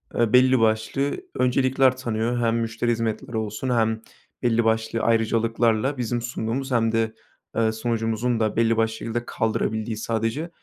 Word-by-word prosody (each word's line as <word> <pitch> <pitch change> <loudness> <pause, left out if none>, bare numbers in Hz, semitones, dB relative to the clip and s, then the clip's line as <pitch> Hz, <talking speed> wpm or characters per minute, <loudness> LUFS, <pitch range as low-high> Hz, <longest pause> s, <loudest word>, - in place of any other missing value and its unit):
eee, 120 0 +1
belli 130 0 +6
başlı 110 +5 +1 0.2
öncelikler 130 0 +2
tanıyor. 120 -1 -1
Hem 115 0 +1
müşteri 115 +1 -1
hizmetleri 115 +1 -2
olsun 110 +4 -3
hem 110 -2 +1 0.4
belli 115 -1 +3
başlı 110 0 0
ayrıcalıklarla 115 +3 +1
bizim 120 0 -2
sunduğumuz 120 +3 -3
hem 115 -2 +2
de, 115 -1 0 0.4
eee, 110 -1 +2
sunucumuzun 115 +1 -1
da 110 -1 0
belli 115 0 +2
başlı 110 0 +1
şekilde 115 +2 -4
kaldırabildiği 110 0 -1
sadece 115 +9 -2
115 Hz, 140 wpm, -24 LUFS, 110-120 Hz, 0.4 s, belli